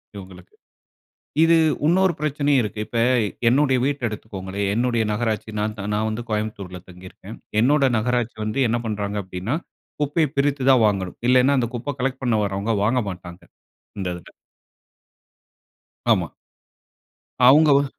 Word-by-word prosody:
இவங்களுக்கு. 95 -2 -12 0.9
இது, 165 0 +5 0.3
உன்னொரு 185 +2 +3
பிரச்சனையும் 145 -2 +1
இருக்கு. 105 0 -5
இப்ப, 115 - -2 0.5
என்னுடைய 135 0 +3
வீட்ட 145 0 -1
எடுத்துக்கோங்களேன், 100 -2 -5
என்னுடைய 120 0 +1
நகராட்சி 110 -1 -2
நான் 105 +1 -2
த 100 - -5
நான் 110 +1 0
வந்து 115 +2 -4
கோயம்புத்தூர்ல 100 -4 -4
தங்கிருக்கேன். 95 +3 -12 0.3
என்னோட 140 +2 +3
நகராட்சி 120 0 -1
வந்து 125 +4 0
என்ன 120 +1 0
பண்றாங்க 105 -1 -3
அப்படின்னா, 95 - -3 0.5
குப்பைய 150 +2 +1
பிரித்து 140 -1 +1
தான் 125 -4 +5
வாங்கணும். 95 -3 -2
இல்லைன்னா, 130 +2 +4
அந்த 120 - -1
குப்ப 130 +3 -5
கலெக்ட் 135 +1 -2
பண்ண 120 - +1
வாரவங்க, 100 +3 -1
வாங்கமாட்டாங்க. 95 -6 -3 0.6
இந்த 95 - -2
இதுல. 85 - -13 1.9
ஆமா. - - -1 1.2
அவங்க 150 +4 +6
ஒ 140 - +2
115 Hz, 130 wpm, -22 LUFS, 100-135 Hz, 1.9 s, அவங்க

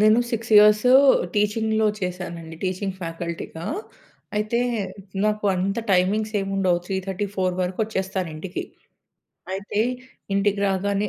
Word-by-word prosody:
నేను 215 +2 +6
6 230 0 -3
ఇయర్స్ 210 +2 +6 0.5
టీచింగ్‌లో 220 +1 +1
చేశానండి 170 -3 -5
టీచింగ్ 185 +1 -2
ఫ్యాకల్టీగా. 165 0 -5 0.7
అయితే 215 +3 0 0.7
నాకు 210 0 0
అంత 195 +4 -1
టైమింగ్స్ 205 +4 +2
ఏముండవ్, 195 -2 +1
3:30-4:00 190 0 -2
వరకొచ్చేస్తాను 190 -1 -2
ఇంటికి. 180 +4 -5 0.9
అయితే 200 +2 -2 0.5
ఇంటికి 200 0 +1
రాగానే 200 +2 0
195 Hz, 95 wpm, -23 LUFS, 185-210 Hz, 0.9 s, నేను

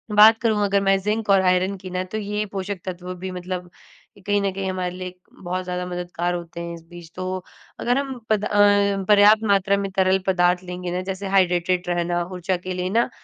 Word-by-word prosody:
बात 220 +2 +8
करूँ 215 -3 +1
अगर 200 0 +2
मैं 195 0 +3
ज़िंक 210 +1 -2
और 195 -1 +6
आयरन 185 +1 +2
की 185 0 -9
ना, 185 0 -1
तो 185 +4 -6
ये 210 0 -2
पोषक 195 -1 -4
तत्व 180 0 -5
भी 185 +1 -6
मतलब 180 0 -5 0.6
कहीं 205 0 +2
न 195 -1 0
कहीं 195 0 -3
हमारे 185 -1 -2
लिए 185 0 -6 0.3
बहुत 185 +1 -2
ज़्यादा 180 0 -3
मददगार 175 0 -3
होते 170 0 -7
हैं, 170 0 -5
इस 165 -1 -10
बीच। 175 -1 -12
तो 185 0 -4 0.4
अगर 245 +2 +1
हम 270 -3 -3
पद 210 -1 +2
अ, - - -2 0.6
पर्याप्त 210 +1 +6
मात्रा 200 0 +3
में 200 -1 -2
तरल 190 0 +3
पदार्थ 180 -1 +2
लेंगे 180 0 -5
ना 180 +1 -2
जैसे 190 +1 -4
हाइड्रेटेड 180 -1 +2
रहना 175 0 0
ऊर्जा 180 +1 -1
के 185 +1 -5
लिए 180 0 -2
ना 235 +4 +2
185 Hz, 210 wpm, -23 LUFS, 180-200 Hz, 0.6 s, बात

